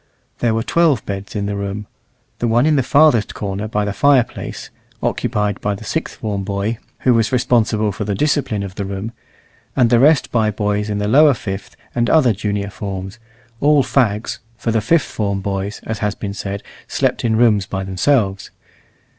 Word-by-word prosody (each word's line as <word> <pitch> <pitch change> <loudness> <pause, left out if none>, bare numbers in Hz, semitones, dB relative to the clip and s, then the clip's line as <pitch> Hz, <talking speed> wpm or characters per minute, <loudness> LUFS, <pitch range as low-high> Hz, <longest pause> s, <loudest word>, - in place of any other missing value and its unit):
There 115 -2 +1
were 115 - 0
twelve 160 -8 +2
beds 100 +1 -6
in 100 -1 -1
the 100 0 -2
room. 100 +1 -4 0.5
The 120 - 0
one 120 +4 +3
in 155 -1 +3
the 135 - +3
farthest 135 -4 +3
corner 100 +1 -3
by 105 -1 -1
the 105 - -2
fireplace, 135 -1 +1 0.3
occupied 105 -1 -1
by 105 0 -1
the - - -10
sixth - - -3
form 100 -3 -3
boy, 100 +3 -2 0.2
who 125 - +4
was 115 -1 +2
responsible 115 -4 +2
for 100 - -4
the 100 -1 -2
discipline 135 -5 0
of 95 -1 -6
the 100 - -4
room, 100 +3 -5 0.6
and 125 -3 +3
the 120 - +5
rest 140 0 +4
by 110 -3 +2
boys 105 0 -1
in 105 - -1
the 105 0 -1
lower 145 +4 +6
fifth 95 -3 -6 0.2
and 120 -1 +1
other 135 -8 +4
junior 100 -1 -3
forms, 95 +1 -6 0.4
all 145 -1 +4
fags 110 -6 0 0.2
(for 115 0 -1
the 110 -1 +1
fifth 160 +10 +2
form 100 -2 -2
boys, 100 +1 -3
as 110 -1 -4
has 105 -1 -1
been 100 -2 -5
said, 100 -1 -5 0.2
slept - - 0
in 115 -2 +2
rooms 110 -4 +3
by 95 -1 -3
themselves). 95 +1 0
105 Hz, 190 wpm, -19 LUFS, 100-120 Hz, 0.6 s, lower